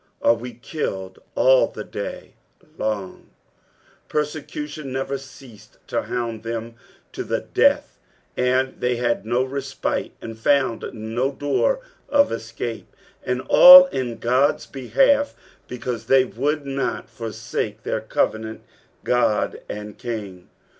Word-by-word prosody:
"Are - - +6
we 120 +1 -7
killed 95 - -5 0.2
ail - - +5
the - - -8
day - - -7 0.4
long," 105 - -4 0.8
Persecution 150 -1 -4
never 135 +1 -2
ceased 130 -4 -15
to - - -1
hound 115 -2 -4
them 115 0 -5 0.4
to - - -5
the - - -2
death, - - +1 0.4
they 125 0 +1
had 120 -3 -1
no 120 +2 +2
respite 135 +1 -3
and 115 -1 -7
found 130 -2 +2
no 115 +5 -2
dcor 145 - 0 0.3
of 285 -1 +4
escape; 115 0 -6 0.3
and 125 0 -1
all 275 - +10
in 125 - -3
God's 130 +5 +2
behalf, 275 - +2 0.3
because 120 -2 -5
they 135 -1 +5
would 145 +6 -2
not 135 -1 -2
foraake 110 -1 -5
their 110 - -2
covenant 110 0 -1 0.4
God 115 -4 +1
and 105 0 -7
King. 105 -7 -6
125 Hz, 120 wpm, -22 LUFS, 115-140 Hz, 0.8 s, all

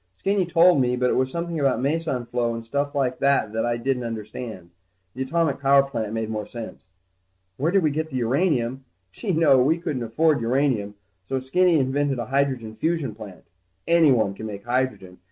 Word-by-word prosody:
Skinny 195 - 0
told 170 -3 +5
me, 125 0 +1
but 125 0 +1
it - - +1
was 130 0 +1
something 170 +2 -3
about 135 -2 +1
meson 140 -2 -1
flow 120 -1 -1
and 115 0 -7
stuff 140 +4 -2
like 130 -3 0
that 140 -6 +2
that 115 +1 -1
I 120 0 0
didn't 125 +1 -1
understand. 110 -4 -7 0.4
The 130 - -6
atomic 150 +2 0
power 140 0 +5
plant 115 -6 -4
made 115 0 -2
more 110 -1 -4
sense. 115 -5 -9 0.7
Where 155 +5 0
did 195 -1 +3
we 155 - +2
get 155 +2 -2
what 155 - -9
uranium? 130 0 0 0.3
Gee, 145 - -4
no, 155 -6 +4
we 155 +6 +3
couldn't 155 -7 -3
afford 145 +5 +1
uranium, 115 -4 0 0.3
so 135 - 0
Skinny 170 +6 +2
invented 135 0 0
a 120 - -3
hydrogen 130 -4 -1
fusion 155 -2 -1
plant. 100 -5 -11 0.4
Anyone 140 -12 +4
can 110 +3 -7
make 100 0 -8
hydrogen. 120 -7 -2
130 Hz, 190 wpm, -24 LUFS, 115-150 Hz, 0.7 s, told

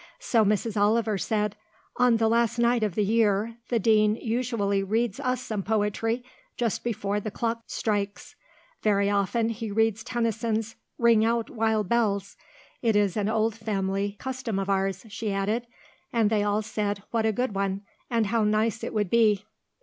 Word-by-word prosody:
So 230 -3 +2
Mrs. 210 +1 0
Oliver 215 -1 +2
said, 210 0 -1 0.4
"On 245 -2 +4
the 225 0 +2
last 235 +1 +2
night 235 0 +3
of 210 -5 -1
the 210 - +2
year, 220 +1 +1
the 240 - +2
Dean 215 -1 +4
usually 225 -4 -1
reads 220 +3 -1
us 255 -2 -1
some 215 -4 -3
poetry, 220 +3 0 0.3
just 235 -3 -1
before 210 -3 -1
the 215 - -4
clock 230 +2 -2
strikes. 205 -2 -3 0.5
Very 200 -1 +2
often 205 +3 +1
he 225 -1 -4
reads 225 +1 +1
Tennyson's 225 -2 -1 0.2
'Ring 230 -2 +4
out, 230 0 0
wild 220 -3 0
bells.' 200 -4 0 0.5
It 225 -3 +2
is 205 -3 +2
an 210 -1 0
old 220 0 +1
family 200 -2 -2
custom 255 -5 -4
of 195 0 -1
ours," 195 +1 -1
she 210 0 -3
added, 210 +5 -1 0.4
and 225 -3 +2
they 215 -2 +2
all 205 +1 +1
said 205 -2 -2
what 225 -1 +1
a - - +3
good 245 0 -1
one, 195 0 -1 0.3
and 230 -2 +2
how 225 +2 +1
nice 215 +1 +1
it - - -4
would 210 -4 0
be. 215 -3 +3
220 Hz, 170 wpm, -26 LUFS, 205-230 Hz, 0.5 s, On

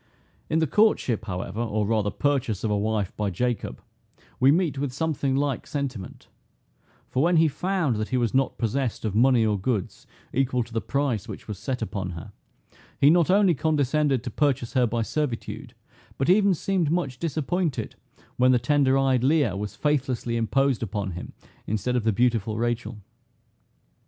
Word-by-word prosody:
In 155 - +1
the 160 - +3
courtship, 140 - +2
however, 95 +1 -4
or 110 -2 -1
rather 105 -1 +1
purchase 125 -6 -1
of 110 - 0
a - - +2
wife 105 -1 -1
by 105 -1 -1
Jacob, 120 +6 -3 0.6
we 130 +2 +6
meet 160 -4 +1
with 140 -2 -2
something 140 -1 -1
like 140 -2 -1
sentiment; 130 -9 -5 0.8
for 130 - -1
when 170 +2 +3
he 160 0 +5
found 160 - -1
that 110 0 -3
he 130 - 0
was 120 -3 0
not 135 0 +1
possessed 120 0 -2
of 105 - -1
money 120 +1 +4
or 105 -2 +1
goods, 105 -2 -3 0.3
equal 125 -2 +1
to 115 - -15
the 115 - 0
price 140 -8 -1
which - - -9
was 105 -3 -6
set 125 +3 -3
upon 95 -4 -4
her, 80 - -9 0.7
he 145 - +6
not 170 -1 +3
only 195 -1 +5
condescended 145 -3 +1
to 125 - -5
purchase 135 -3 0
her 125 -3 +3
by 115 +1 -1
servitude, 135 -1 -4 0.4
but 135 +6 +2
even 200 -1 +4
seemed 185 -3 0
much 150 -7 -1
disappointed 160 0 -2 0.4
when 125 +1 +5
the 125 - +5
tender 135 +2 +2
eyed 135 -2 +2
Leah 140 - +2
was 105 +1 -5
faithlessly 130 -5 -1
imposed 130 +3 +1
upon 100 -3 -3
him 90 +1 -8 0.3
instead 110 +4 -1
of 120 - +1
the 110 - +4
beautiful 115 -1 +1
Rachel. 120 -1 -2
125 Hz, 170 wpm, -25 LUFS, 110-145 Hz, 0.8 s, we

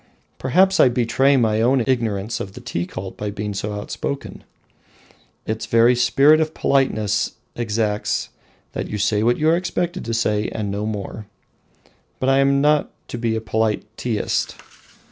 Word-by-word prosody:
Perhaps 190 +9 +3
I 130 - +7
betray 125 +3 +2
my 110 -3 +2
own 125 +1 +3
ignorance 115 -4 -1
of 95 - -6
the - - -9
Tea 85 +1 -3
Cult 95 0 -7
by 105 - -3
being 105 0 -4
so 105 +2 -3
outspoken. 105 +6 -5 1.0
Its 110 0 -3
very 115 +2 +5
spirit 140 +5 +5
of 155 0 -2
politeness 110 -6 +1 0.2
exacts 105 -2 -1 0.4
that - - -4
you 105 - -3
say 105 +1 +1
what 120 +2 +2
you 155 - +1
are 165 - +5
expected 175 0 -2
to 115 - -2
say, 105 -2 +1
and 105 -3 -3
no 105 +2 -2
more. 105 0 -5 0.9
But 130 - +1
I 135 0 +4
am 140 0 +3
not 150 0 +3 0.2
to 120 - -5
be 115 -1 0
a 110 - -2
polite 110 -1 0
Teaist. 115 -4 -1
115 Hz, 165 wpm, -21 LUFS, 105-135 Hz, 1.0 s, I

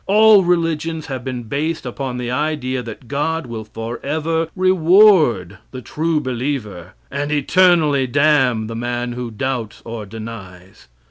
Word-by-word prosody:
All 210 0 +6
religions 165 -2 0
have 130 -3 -5
been 125 -2 -4
based 145 +7 -3
upon 125 0 -4
the 125 -1 -3
idea 130 -2 -1
that 115 0 -10
God 155 +5 -2
will 115 -2 -6
forever 150 +9 -3
reward 180 - +4
the 130 -1 -9
true 160 +3 -1
believer, 120 - -4 0.2
and 145 +2 -3
eternally 150 -2 +3
damn 135 -4 +2
the 115 +1 -6
man 120 +1 -3
who 120 0 -5
doubts 115 -1 -4
or 115 -3 -6
denies. 100 -4 -10
130 Hz, 135 wpm, -19 LUFS, 115-160 Hz, 0.2 s, All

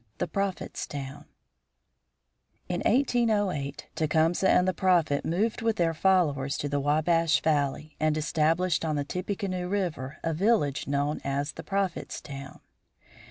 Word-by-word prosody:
THE - - -1
PROPHET'S 195 -2 -3
TOWN 140 0 -7 1.4
In - - -2
1808 210 - +1
Tecumseh 160 +4 +2
and 180 - +4
the 185 - +2
Prophet 170 -7 +2
moved 210 +8 0
with 225 -1 +1
their 170 -5 +1
followers 155 -6 +2
to 145 - -2
the 145 0 0
Wabash 155 +3 +2
Valley, 150 0 0
and 155 0 +1
established 160 +3 +1
on 155 -2 0
the 145 - 0
Tippecanoe 185 +1 -3
River 170 -9 -2
a 165 - 0
village 160 - +1
known 145 +2 -1
as 140 +1 -1
the 165 - -8
Prophet's 195 +1 -2
Town. 135 -1 -9
160 Hz, 135 wpm, -28 LUFS, 145-185 Hz, 1.4 s, and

